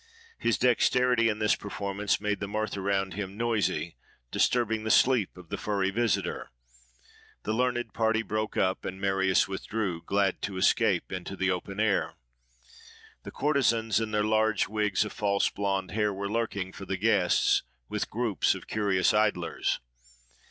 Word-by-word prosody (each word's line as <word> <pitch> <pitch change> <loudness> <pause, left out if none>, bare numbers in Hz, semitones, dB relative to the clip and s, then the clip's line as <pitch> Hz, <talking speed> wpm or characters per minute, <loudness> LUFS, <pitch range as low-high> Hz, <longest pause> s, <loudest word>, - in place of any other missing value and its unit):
His 115 - +1
dexterity 125 -1 +3
in 105 - -1
this 105 -1 +2
performance 100 0 -2
made 105 0 -1
the 100 - -3
mirth 110 +1 -2
around 95 -1 -1
him 100 -1 -5
noisy, 105 -8 -1 0.3
disturbing 110 -3 +1
the 110 - -2
sleep 120 -6 +3
of 90 -3 -13
the - - -4
furry 100 -2 0
visitor: 115 +1 -1 0.9
the 110 - -1
learned 120 +1 -1
party 110 0 +1
broke 110 0 -3
up; 95 0 +1
and 95 - -5
Marius 95 -1 +2
withdrew, 95 -2 -3
glad 100 0 0
to 100 -2 -4
escape 95 - +2
into 95 +1 -5
the 95 0 0
open 95 +2 -4
air. 110 -2 +1 1.1
The - - -7
courtesans 115 -7 +1
in 110 -1 -2
their 105 -1 +1
large 110 0 +2
wigs 105 -2 0
of 105 - -7
false 100 -1 +1
blond 95 -1 -2
hair, 105 0 +1
were 100 +1 -4
lurking 100 -5 -2
for 100 - -8
the 95 - -2
guests, 100 -3 +3 0.3
with - - -3
groups 115 -3 +1
of - - -9
curious 100 -4 +1
idlers. 105 -5 0
105 Hz, 155 wpm, -28 LUFS, 95-110 Hz, 1.1 s, dexterity